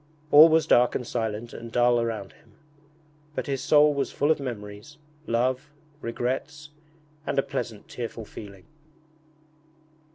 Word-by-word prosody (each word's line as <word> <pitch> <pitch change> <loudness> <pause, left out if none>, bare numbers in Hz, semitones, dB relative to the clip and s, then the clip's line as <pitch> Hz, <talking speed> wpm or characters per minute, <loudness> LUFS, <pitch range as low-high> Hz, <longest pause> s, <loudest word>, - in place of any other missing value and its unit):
All 155 +3 +10
was 160 -1 +3
dark 125 -5 +4
and 125 - -2
silent 115 -1 -3
and 115 0 -9
dull 120 0 +3
around 110 -4 -4
him, 110 - -25 0.8
but - - -2
his 135 -2 -2
soul 150 +1 +5
was 140 -1 -2
full 145 +2 +1
of 160 - +1
memories, 110 +1 -7 0.3
love, 130 +5 0 0.3
regrets, 135 +6 -4 0.6
and - - -2
a 135 - +3
pleasant 120 -6 -5
tearful 115 -2 -6
feeling. 100 -3 -11
125 Hz, 135 wpm, -26 LUFS, 115-145 Hz, 0.8 s, All